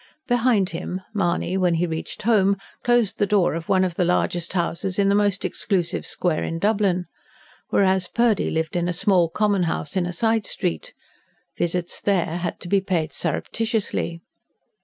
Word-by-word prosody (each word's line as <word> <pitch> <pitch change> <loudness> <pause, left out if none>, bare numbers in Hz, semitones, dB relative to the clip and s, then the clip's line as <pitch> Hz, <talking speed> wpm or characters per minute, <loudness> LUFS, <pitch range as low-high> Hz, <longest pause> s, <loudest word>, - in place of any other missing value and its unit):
Behind 240 -6 +2
him, 180 +2 -4
Mahony, 185 -2 0
when 180 -3 +2
he 170 +2 +1
reached 160 -1 -5
home, 200 -3 +3 0.3
closed 240 -4 +2
the 205 - +2
door 195 -5 +3
of 165 0 -5
one 190 -1 +4
of 185 -2 0
the 180 - 0
largest 175 0 0
houses 185 +1 -1
in 200 -1 +3
the - - +3
most 205 -1 +1
exclusive 180 -5 -1
square 175 -4 0
in 165 - -3
Dublin. 200 -2 +1 0.6
Whereas 190 -2 +2
Purdy 235 -4 +2
lived 160 0 -2
in 175 0 0
a 180 - 0
small, 180 -1 +3
common 205 +2 +1
house 165 -2 -2
in 180 -2 +1
a - - -3
side 225 +3 +1
street. 80 -2 -3 0.6
Visits 175 0 -2
there 175 -4 +1
had 175 -1 -4
to - - -7
be 195 +2 +2
paid 175 -5 -1
surreptitiously. 205 -1 -2
185 Hz, 170 wpm, -23 LUFS, 170-205 Hz, 0.6 s, one